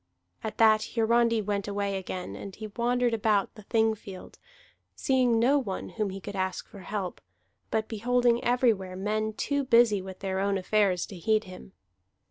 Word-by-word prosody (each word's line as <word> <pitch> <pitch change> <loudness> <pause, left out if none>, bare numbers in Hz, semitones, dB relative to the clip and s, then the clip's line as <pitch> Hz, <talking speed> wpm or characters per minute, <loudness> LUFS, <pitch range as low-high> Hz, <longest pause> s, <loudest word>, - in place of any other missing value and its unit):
At 220 - -5
that 220 -1 +4
Hiarandi 230 -1 +3
went 200 0 -2
away 200 -1 -1
again; 185 -1 -5
and 195 -1 -8
he 220 - -7
wandered 240 +2 +1
about 210 -2 +1
the 215 - -12
Thing 220 +1 +2
field, 195 -3 -11 0.6
seeing 255 -3 +2
no 265 +6 +4
one 200 -8 -4
whom 215 -3 -2
he 195 +1 -6
could 200 +1 -7
ask 190 -1 -2
for 200 - -12
help, 190 -1 -5 0.5
but 220 0 -1
beholding 240 +2 +1
everywhere 230 -7 +1
men 215 +3 -1
too 285 +5 -1
busy 230 -5 +4
with 190 0 -8
their 190 -1 -2
own 200 0 +1
affairs 190 -1 +1
to 195 - -10
heed 215 +4 +2
him. 185 0 -12
215 Hz, 170 wpm, -28 LUFS, 195-235 Hz, 0.6 s, that